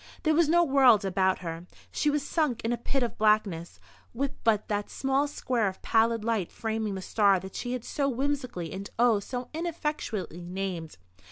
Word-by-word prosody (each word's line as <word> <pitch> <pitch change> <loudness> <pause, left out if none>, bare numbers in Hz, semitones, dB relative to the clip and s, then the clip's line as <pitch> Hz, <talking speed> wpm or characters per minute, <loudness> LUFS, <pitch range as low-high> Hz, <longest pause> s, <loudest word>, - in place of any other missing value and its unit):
There 315 -2 +3
was 320 -1 +3
no 345 +1 +5
world 260 -8 +5
about 190 0 +1
her. 165 0 -6 0.2
She 300 - +1
was 290 -1 -1
sunk 295 -9 0
in 235 - +1
a - - -1
pit 265 +2 -1
of 235 - -4
blackness, 200 - +1 0.4
with 275 +3 -1
but 215 -2 +2
that 205 -1 -2
small 270 +1 0
square 245 -6 -1
of 190 - -4
pallid 230 -1 +2
light 220 -6 -1
framing 220 -2 -2
the 190 - -5
star 200 -2 +3
that 190 +1 -9
she 245 0 -3
had 250 -2 -4
so 280 -2 0
whimsically 250 - -2
and 195 +2 -6
oh, 235 -3 +4
so 245 +4 -5
ineffectually 300 - -3
named. 175 - -5
225 Hz, 185 wpm, -28 LUFS, 195-270 Hz, 0.4 s, no